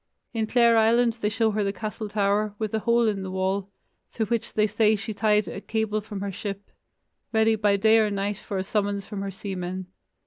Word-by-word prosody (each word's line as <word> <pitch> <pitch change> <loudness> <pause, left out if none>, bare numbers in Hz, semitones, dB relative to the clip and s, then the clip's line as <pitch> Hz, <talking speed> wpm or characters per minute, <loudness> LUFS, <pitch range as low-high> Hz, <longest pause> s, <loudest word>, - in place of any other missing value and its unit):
In 220 -2 -1
Clare 235 -1 +4
Island 230 +1 +3
they 210 - +1
show 225 +1 +1
her 205 -1 0
castle 215 +1 -5
tower, 205 0 +1
with 215 -1 -3
a 220 - +1
hole 235 +1 +3
in 205 -2 0
the 190 - -5
wall, 190 +1 -1 0.4
through 225 - -1
which 230 +2 -2
they 215 - +3
say 215 +1 +3
she 215 +1 -5
tied 210 0 +2
a 195 - -6
cable 220 -1 -1
from 205 -2 -7
her 200 0 -3
ship, 200 +1 -6 0.6
ready 220 0 +3
by 205 -1 +2
day 220 +2 +5
or 215 -1 +3
night 200 0 -2
for 200 - -5
a 185 - -1
summons 200 0 -1
from 205 -3 -6
her 200 - -3
seamen. 185 -1 -5
210 Hz, 210 wpm, -25 LUFS, 200-220 Hz, 0.6 s, day